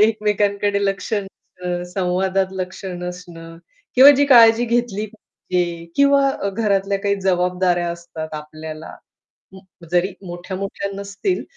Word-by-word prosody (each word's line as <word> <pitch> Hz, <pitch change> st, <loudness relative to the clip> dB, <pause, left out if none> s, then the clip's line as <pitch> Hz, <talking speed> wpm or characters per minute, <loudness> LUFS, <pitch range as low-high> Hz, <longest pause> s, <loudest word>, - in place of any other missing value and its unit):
एकमेकांकडे 205 Hz, -2 st, +1 dB
लक्ष 195 Hz, +3 st, -2 dB
नसणं. 180 Hz, -3 st, -5 dB
संवादात 190 Hz, +1 st, 0 dB
लक्ष 185 Hz, +1 st, -6 dB
नसणं 180 Hz, -2 st, -7 dB, 0.4 s
किंवा 265 Hz, +3 st, +10 dB
जी 285 Hz, -, +4 dB
काळजी 235 Hz, -3 st, +7 dB
घेतली 235 Hz, -3 st, -1 dB
पाहिजे 180 Hz, -5 st, -4 dB
किंवा 275 Hz, -6 st, +3 dB
घरातल्या 200 Hz, -2 st, 0 dB
काही 200 Hz, 0 st, +1 dB
जबाबदाऱ्या 180 Hz, -1 st, +1 dB
असतात 165 Hz, -2 st, -7 dB
आपल्याला. 155 Hz, +1 st, -8 dB, 0.6 s
उम्म, 185 Hz, -2 st, -16 dB
जरी 180 Hz, +2 st, +2 dB
मोठ्या-मोठ्या 190 Hz, +3 st, -5 dB
नसतील 200 Hz, -, -3 dB
190 Hz, 110 wpm, -20 LUFS, 175-210 Hz, 0.6 s, किंवा